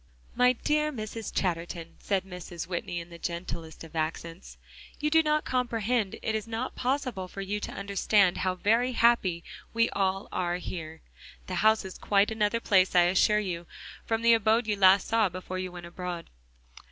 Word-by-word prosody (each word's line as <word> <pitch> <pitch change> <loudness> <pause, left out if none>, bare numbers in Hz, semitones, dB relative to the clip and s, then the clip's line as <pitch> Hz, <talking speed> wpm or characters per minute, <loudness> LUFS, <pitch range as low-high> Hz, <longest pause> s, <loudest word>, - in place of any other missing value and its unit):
"My 250 0 +5
dear 300 +4 0
Mrs. 220 -3 -6
Chatterton," 170 -2 -2
said 195 -2 0
Mrs. 180 -2 -7
Whitney 175 0 -3
in 170 +1 -10
the 170 - -10
gentlest 170 -2 -5
of 165 0 -12
accents, 165 +2 -4 0.4
"you 300 +1 0
do 320 +1 +6
not 305 -1 +1
comprehend; 235 -4 0
it 220 - 0
is 220 0 -2
not 230 +3 -3
possible 255 -7 -2
for 195 - -7
you 200 +2 -2
to - - -5
understand 200 -1 +2
how 185 -1 0
very 230 +7 +2
happy 215 -8 +3 0.3
we 230 0 +3
all 195 0 0
are 175 -1 -1
here. 160 -3 -7 0.4
The 185 - -6
house 220 -1 +4
is 190 - -8
quite 200 +1 +2
another 220 +1 +1
place, 190 -5 +3
I 175 - +7
assure 210 +2 +4
you, 175 -5 -3 0.4
from 225 0 -1
the 235 0 +6
abode 225 +1 +3
you 215 - 0
saw 200 - -6 0.4
last 205 -5 +3
before 185 0 -5
you 185 -1 -4
went 175 -1 -9
abroad." 175 0 -6
195 Hz, 175 wpm, -28 LUFS, 175-230 Hz, 0.4 s, I